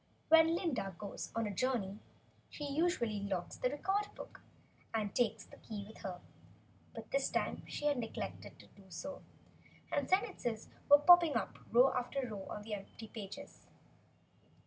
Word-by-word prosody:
When 325 +1 +7
Glinda 265 - -1
goes 205 -1 -6
on 230 0 +1
a 205 - -3
journey, 210 -3 0 0.5
she 295 - -7
usually 280 - +1
locks 195 -3 -3
the 250 - +1
Record 390 +9 0
book - - -10 0.5
and 210 -3 -1
takes 225 -2 +1
the - - -15
key 205 -3 -6
with 220 - -12
her. 180 -2 -5 0.8
But - - -8
this - - +2
time, - - -1
she 295 - -4
had 290 -3 +3
neglected 225 -2 -5
to - - -14
do 200 - -19
so, 280 +11 -6 0.7
and - - 0
sentences 240 - 0 0.2
were 290 - +11
popping 340 -1 +7
up, 225 - -2
row 250 +3 +6
after 255 +1 -1
row 205 -4 -6
on 210 - -5
the 215 0 -5
open 210 +2 -7
pages. 200 -4 -9
235 Hz, 160 wpm, -35 LUFS, 205-295 Hz, 0.8 s, were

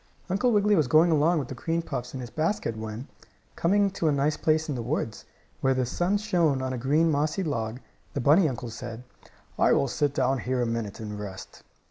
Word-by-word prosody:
Uncle 240 +6 +2
Wiggily 210 -1 +4
was 155 -7 +2
going 160 +5 +5
along 160 +3 +3
with 140 -5 -2
the - - -6
cream 165 +7 -2
puffs 125 -4 -5
in 130 - -4
his 120 - -8
basket 165 - -1
when, 110 +4 -6 0.5
coming 200 +3 +2
to 180 -4 -1
a - - +4
nice 145 +2 +1
place 155 0 +1
in 150 - -2
the 125 - -3
woods, 115 -3 -3 0.3
where 135 0 +2
the 130 -1 +1
sun 175 +10 0
shone 175 -9 +1
on 130 0 -2
a - - -3
green, 150 +6 +2
mossy 150 +6 0
log, 115 -6 -3 0.4
the - - 0
bunny 155 +6 +5
uncle 120 -2 -6
said: 120 0 -7 0.6
"I - - +5
will 140 - +2
sit 145 +2 -1
down 130 -1 +1
here 130 +1 -1
a 120 - +1
minute 115 -3 -3
and 105 -2 -6
rest." 95 -2 -8
140 Hz, 215 wpm, -27 LUFS, 120-165 Hz, 0.6 s, going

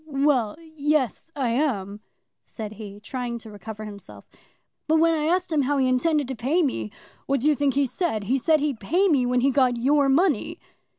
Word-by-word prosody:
"Well; 275 -6 +1 0.2
yes, 295 - 0
I 265 -4 0
am," 220 -6 -1 0.4
said 215 -3 -8
he, 205 -1 -9
trying 240 +2 -4
to 225 -2 -11
recover 215 +1 -8
himself. 205 -1 -11 0.6
"But 315 +1 +3
when 330 +1 +4
I 305 -2 -1
asked 355 +2 0
him 300 - +3
how 280 +2 0
he 265 -1 +2
intended 290 +3 +1
to 265 - -3
pay 280 +10 +1
me, 115 - -2 0.4
what 275 -2 +1
do 290 - +1
you 305 - +5
think 280 -1 0
he 280 0 +3
said? 265 - -2
He 255 +7 0
said 310 +2 +2
he'd 285 -6 -1
pay 350 - +2
me 265 -6 +2
when 250 0 +1
he 275 +2 +3
got 255 -2 +2
your 280 +3 +3
money." 295 - +1
270 Hz, 200 wpm, -24 LUFS, 230-300 Hz, 0.6 s, you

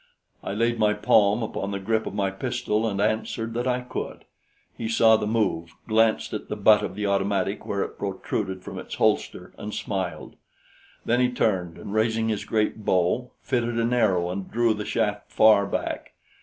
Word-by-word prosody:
I - - -3
laid 115 +1 +1
my 105 -1 +3
palm 105 +1 +3
upon 100 -2 -3
the 100 0 -3
grip 110 +3 0
of - - -5
my 100 -2 0
pistol 115 0 -1
and 100 -1 -3
answered 110 +2 -1
that 120 +2 -2
I 125 0 +1
could. 125 - -6 0.5
He 115 - -4
saw 115 0 +5
the 105 -1 -1
move, 95 -7 -1
glanced 110 0 +2
at 105 - -5
the - - -2
butt 105 0 +5
of - - -4
the 105 - -2
automatic 100 0 0
where 100 -1 0
it - - -8
protruded 95 -1 -3
from - - -7
its - - -7
holster, - - 0
and 105 0 -5
smiled. 95 -6 -4 0.7
Then 120 +1 +2
he 125 0 +3
turned 95 -8 0
and 100 - -7
raising 110 +1 +1
his 105 -2 -2
great 110 0 0
bow, 95 +7 +1
fitted 120 -1 0
an 115 +1 +1
arrow 95 -7 +2
and 95 0 -5
drew 115 -1 +2
the 105 -1 -5
shaft 105 -2 -1
far 105 -2 +5
back. - - -4
105 Hz, 185 wpm, -25 LUFS, 100-115 Hz, 0.7 s, saw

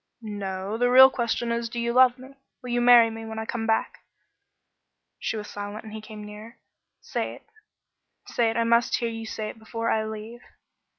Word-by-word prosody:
"No. 200 -1 -4
The 245 0 +3
real 260 +1 +9
question 235 -1 -1
is, 235 0 -2
Do 235 - -5
you 235 0 -1
love 255 0 +5
me? 260 +2 -13 0.3
Will 250 - -5
you 240 0 +1
marry 240 -2 +7
me 225 0 -7
when 220 0 -7
I 220 - -3
come 225 0 -3
back?" 220 0 0 1.2
She 225 - -2
was 210 -1 -6
silent 205 +1 -7
and 215 -1 -10
he 220 - -6
came 215 -1 -10
nearer. 210 +3 -11 0.4
"Say - - -3
it. - - -18 0.8
Say 235 -2 +1
it. 225 - -3
I 230 - +3
must 235 +1 +3
hear 235 -2 -2
you 225 -1 -6
say 215 -1 -4
it - - -10
before 230 +1 -3
I 220 - +1
leave." 220 +2 -7
225 Hz, 200 wpm, -25 LUFS, 215-235 Hz, 1.2 s, real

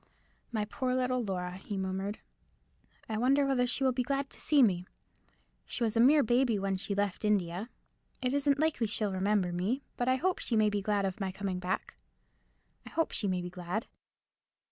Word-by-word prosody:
"My 215 -3 -1
poor 255 +3 -2
little 255 -1 +1
Laura!" 180 -3 -3
he 200 +1 -5
murmured; 190 +2 -2 0.9
"I 220 -1 -2
wonder 275 +4 +4
whether 255 -2 +2
she 255 +2 +1
will 260 - +4
be 250 0 0
glad 275 +2 -1
to - - -7
see 290 -3 +5
me. 180 -5 +2 0.8
She 245 - -1
was 225 -1 0
a - - +2
mere 285 +5 +6
baby 240 -1 +2
when 195 0 -1
she 200 +1 -2
left 200 -1 -1
India. 200 0 0 0.5
It 255 0 -1
isn't 285 0 +2
likely 300 -6 +1
she'll 210 -1 0
remember 190 -1 +1
me. 210 +11 -1
But 245 - -1
I 255 - +4
hope 365 +7 0
she 235 - -1
may 215 -1 +4
be 205 -1 -1
glad 205 0 +1
of 190 +1 -3
my 195 -2 -2
coming 190 -1 -3
back—I 180 +1 -8
hope 325 - 0
she 210 - 0
may 180 -2 -1
be 180 - -6
glad." 180 +5 -3
215 Hz, 190 wpm, -31 LUFS, 190-255 Hz, 0.9 s, mere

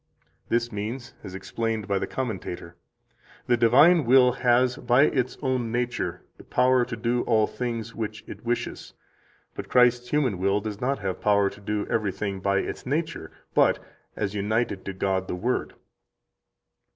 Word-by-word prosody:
This 120 +1 +1
means, 115 +5 -5
as 95 -2 -8
explained 110 +3 -3
by 100 -1 +1
a 95 - -2
commentator: 95 -8 -5 0.7
"The 125 - +3
divine 140 +9 +6
will 125 +1 +6
has, 125 0 +2
by 125 +3 +4
its 130 -4 0
own 130 -4 0
nature, 120 -7 -2
the - - -13
power 125 0 +3
to 120 - -5
do 120 +2 0
all 110 -2 +4
things 115 -2 -4
which 110 -1 -5
it - - -10
wishes; 120 0 -3 0.6
but - - -7
Christ's 125 -1 +4
human 130 -10 +1
will 100 +2 +2
does 105 -1 -6
not 135 +2 0
have 95 -1 -4
power 100 -1 +3
to 105 - -14
do 105 +1 -2
everything 100 -2 -2
by 100 +1 +1
its - - -6
nature, 145 - -3 0.2
but - - +4 0.4
as 100 -2 -2
united 105 0 -1
to 100 - -4
God 95 0 -1
the - - -3
Word." 120 +8 -2
115 Hz, 160 wpm, -26 LUFS, 100-125 Hz, 0.7 s, divine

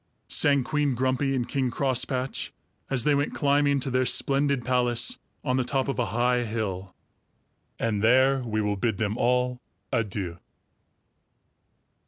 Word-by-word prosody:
sang 140 -2 +3
Queen 145 -1 0
Grumpy 130 +2 0
and 125 -2 -1
King 130 -1 0
Crosspatch, 130 0 -1 0.4
as 125 -3 +1
they 150 - +3
went 145 +1 0
climbing 140 0 +2
to 130 0 -2
their 130 0 +1
splendid 140 -2 +1
palace 125 - +1 0.2
on 130 -2 0
the 130 - +2
top 135 +1 -1
of 135 - -2
a 120 - +1
high 120 +4 +1
hill; 100 -5 -4 0.8
and 105 -3 -1
there 130 +4 +4
we 110 -3 -2
will 105 -1 -1
bid 110 0 -1
them 105 0 -1
all 125 +1 +1 0.3
adieu! 100 -7 -2
125 Hz, 145 wpm, -26 LUFS, 115-135 Hz, 0.8 s, there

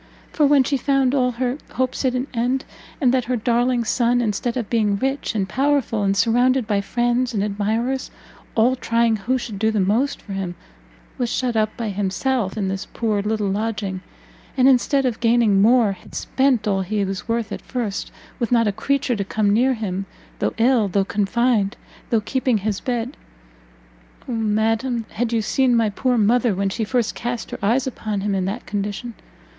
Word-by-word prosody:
For 300 -2 +3
when 280 -2 +5
she 275 +2 0
found 270 -1 +2
all 250 -3 +2
her 250 +3 -2
hopes 255 +1 -1
at 255 -1 +1
an 255 +1 -1
end, 250 +3 0 0.3
and 255 -5 +3
that 255 -2 +1
her 250 +1 0
darling 240 +1 +1
son, 240 +1 +2
instead 235 +2 -1
of 235 -4 -2
being 210 -3 +1
rich 270 +1 -2
and 195 -3 0
powerful, 270 -3 +1
and 200 0 +1
surrounded 245 +4 +3
by 205 -1 0
friends 240 +3 0
and 200 - +1
admirers, 220 +6 -1 0.5
all 240 +3 +4
trying 230 -2 +1
who 250 +6 0
should 220 -5 -6
do 220 +1 +2
the 220 -1 0
most 220 +9 +1
for 200 - -9
him, 190 -2 -3 0.6
was 245 -2 0
shut 245 -1 -1
up 215 -1 0
by 230 -2 -2
himself 205 +3 -1
in 200 -3 -1
this 190 0 -3
poor 215 -3 -1
little 210 -1 -1
lodging, 205 -2 -2 0.6
and 255 0 +5
instead 270 +1 +3
of 240 -3 -1
gaining 230 -4 +3
more, 230 -1 +5
had 185 -2 -11
spent 260 -5 +1
all 195 -2 +1
he 200 +2 -1
was 195 +1 -5
worth 230 -1 -1
at - - -5
first, 230 -6 -4 0.3
with 235 - -1
not 230 -2 +4
a - - +2
creature 250 +4 0
to 200 - -2
come 205 +1 0
near 255 +4 +3
him, 195 -3 -4 0.3
though - - -1
ill, 230 -2 +3
though 195 +1 +1
confined, 210 +1 +1 0.3
though 225 -2 +2
keeping 255 +1 0
his 205 -1 -2
bed! 245 +1 -3 1.1
Oh - - -4
madam, 225 +2 0
had 235 +1 -2
you 225 -2 +1
seen 255 +2 +2
my 225 -2 +2
poor 250 +4 0
mother 225 0 +3
when 195 +1 0
she 220 +4 -2
first 235 +1 0
cast 240 -1 -4
her - - -5
eyes 235 +6 +2
upon 215 -6 -3
him 205 0 -1
in 190 -1 0
that 205 +6 -4
condition! 205 +3 -4
230 Hz, 190 wpm, -21 LUFS, 205-250 Hz, 1.1 s, when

